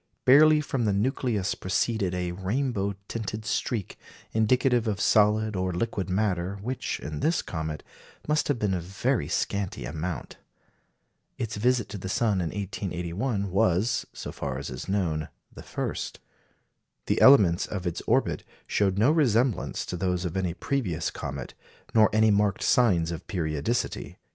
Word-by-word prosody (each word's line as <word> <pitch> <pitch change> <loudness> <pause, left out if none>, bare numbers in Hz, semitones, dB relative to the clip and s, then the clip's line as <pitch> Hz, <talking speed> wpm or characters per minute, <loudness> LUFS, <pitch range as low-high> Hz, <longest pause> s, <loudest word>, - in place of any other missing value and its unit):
Barely 150 +3 +7
from 135 -5 -1
the 105 - +2
nucleus 105 -2 0
proceeded 95 0 -1
a 90 -1 -2
rainbow 100 +2 -1
tinted 110 -1 -4
streak, 110 -2 -2 0.3
indicative 120 +1 +2
of 100 -2 -1
solid 105 0 +3
or 95 0 0
liquid 95 0 -2
matter, 95 -1 0
which, 130 +3 -3
in 75 0 -5
this 165 +2 +1
comet, 80 -2 -4 0.4
must 150 0 +1
have 145 - +1
been 105 -4 0
of 90 - -1
very 95 - -1
scanty 100 +3 -2
amount. 80 -2 -5 1.0
Its 115 -4 -3
visit 120 +2 +1
to 100 - -6
the 95 - -5
sun 105 -2 +1
in 85 - -1
1881 100 +3 -3
was, 95 +5 +2
so - - -7
far 70 -2 -4
as 70 0 -5
is 65 +8 -7
known, 85 -6 -1 0.2
the - - -10
first. - - -4 0.9
The - - 0
elements 100 -11 +6
of 95 -3 -5
its 85 - -2
orbit - - +1 0.2
showed 100 -2 +1
no 115 +8 +5
resemblance 125 - +1
to - - -4
those 90 0 -1
of 90 - -3
any 90 -3 -1
previous 95 - -1
comet, 70 -3 -6 0.4
nor 110 -2 +6
any 110 0 +4
marked 100 -1 +2
signs 90 -9 +3
of 80 - -7
periodicity. 80 +5 -2
100 Hz, 150 wpm, -27 LUFS, 90-115 Hz, 1.0 s, Barely